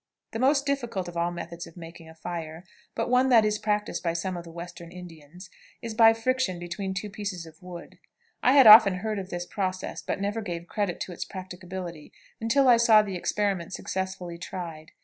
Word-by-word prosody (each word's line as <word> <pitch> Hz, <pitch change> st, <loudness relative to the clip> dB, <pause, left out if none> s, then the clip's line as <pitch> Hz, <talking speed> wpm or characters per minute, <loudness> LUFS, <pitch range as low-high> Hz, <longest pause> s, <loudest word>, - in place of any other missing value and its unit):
The 225 Hz, -, -4 dB
most 280 Hz, +3 st, +3 dB
difficult 240 Hz, -10 st, -2 dB
of 175 Hz, -, -8 dB
all 170 Hz, 0 st, +1 dB
methods 170 Hz, 0 st, -7 dB
of 165 Hz, -, -16 dB
making 165 Hz, -1 st, -11 dB
a 160 Hz, -, -14 dB
fire, 165 Hz, 0 st, -6 dB, 0.3 s
but -, -, -1 dB
one 255 Hz, +1 st, +3 dB
that 230 Hz, -4 st, +6 dB
is 210 Hz, 0 st, 0 dB
practiced 210 Hz, 0 st, -1 dB
by 170 Hz, -1 st, -1 dB
some 180 Hz, +2 st, -3 dB
of 175 Hz, -, -6 dB
the 170 Hz, -, -12 dB
Western 170 Hz, 0 st, -9 dB
Indians, 175 Hz, 0 st, -12 dB, 0.3 s
is 230 Hz, -2 st, -6 dB
by 225 Hz, 0 st, +7 dB
friction 225 Hz, -4 st, 0 dB
between 190 Hz, +3 st, -5 dB
two 190 Hz, +3 st, -3 dB
pieces 195 Hz, -5 st, -5 dB
of 160 Hz, -1 st, -16 dB
wood. 180 Hz, -1 st, -10 dB, 0.4 s
I 255 Hz, -, +4 dB
had 275 Hz, -2 st, +7 dB
often 215 Hz, -3 st, +10 dB
heard 215 Hz, -1 st, -2 dB
of 190 Hz, -1 st, -7 dB
this 175 Hz, -1 st, -4 dB
process, 185 Hz, -1 st, -3 dB
but -, -, -3 dB
never 205 Hz, +3 st, -2 dB
gave 175 Hz, -4 st, -5 dB
credit 195 Hz, -1 st, -2 dB
to -, -, -4 dB
its 175 Hz, -, -4 dB
practicability 180 Hz, -3 st, -8 dB, 0.3 s
until 265 Hz, +5 st, +3 dB
I 245 Hz, -2 st, +7 dB
saw 225 Hz, -2 st, +6 dB
the 200 Hz, -2 st, -5 dB
experiment 190 Hz, -1 st, -1 dB
successfully 190 Hz, -3 st, -4 dB
tried. 165 Hz, -3 st, -7 dB
185 Hz, 200 wpm, -27 LUFS, 170-215 Hz, 0.4 s, often